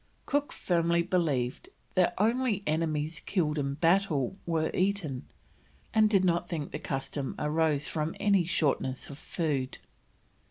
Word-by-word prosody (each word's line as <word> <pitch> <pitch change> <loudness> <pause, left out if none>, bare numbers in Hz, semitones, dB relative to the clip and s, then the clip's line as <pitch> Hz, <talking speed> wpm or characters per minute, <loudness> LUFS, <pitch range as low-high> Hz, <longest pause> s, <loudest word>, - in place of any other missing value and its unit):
Cook 290 0 0
firmly 170 -1 +1
believed 165 - 0 0.2
that 185 -2 +3
only 225 -1 +1
enemies 155 0 0
killed 155 -6 0
in 140 -1 -1
battle 165 -2 +2
were 160 -2 +1
eaten, 180 -9 -1 0.7
and 215 -1 +5
did 195 -3 +3
not 175 0 +1
think 155 -4 -3
the 150 - -4
custom 135 -1 -3
arose 150 -1 +1
from 155 0 -2
any 200 -3 +4
shortness 145 -6 0
of 140 - -10
food. 140 -6 -2
165 Hz, 130 wpm, -29 LUFS, 150-185 Hz, 0.7 s, and